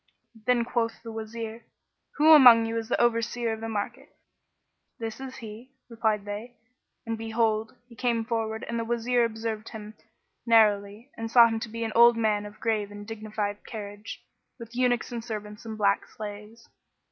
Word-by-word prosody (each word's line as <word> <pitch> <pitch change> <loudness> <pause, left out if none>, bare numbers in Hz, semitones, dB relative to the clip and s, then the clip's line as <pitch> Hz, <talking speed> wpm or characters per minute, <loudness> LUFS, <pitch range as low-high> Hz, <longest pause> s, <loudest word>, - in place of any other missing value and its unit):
Then 245 -2 +3
quoth 230 -2 -2
the 230 - -7
Wazir, 225 +1 -6 0.5
"Who 310 +2 +6
among 245 -6 +9
you 225 0 -3
is 225 0 -3
the - - +1
Overseer 235 0 +1
of 220 - -7
the 225 - -4
market?" 205 -2 -4 0.9
"This 225 -1 -5
is 265 -1 -7
he," 230 +4 -10 0.2
replied 220 -3 0
they; 210 +4 -6 0.5
and 225 -1 -3
behold, 225 -1 0
he 245 - -16
came 235 -2 0
forward 225 -1 -2
and 235 0 -2
the - - -1
Wazir 240 +1 +1
observed 225 -1 -3
him 215 -1 -9 0.5
narrowly 215 +1 +3
and 225 0 -4
saw 235 0 +8
him 225 -1 -2
to 220 - -6
be 230 +1 -4
an 225 -1 -3
old 235 0 +7
man 210 -2 +1
of 205 - -14
grave 215 -3 -1
and 205 0 -9
dignified 215 -2 -4
carriage, 205 -1 -8 0.3
with 230 -1 -11
eunuchs 245 -1 +1
and 235 -1 -4
servants 210 -2 -7
and 220 -1 -6
black 200 -1 +2
slaves. 210 +2 -9
225 Hz, 170 wpm, -27 LUFS, 215-235 Hz, 0.9 s, among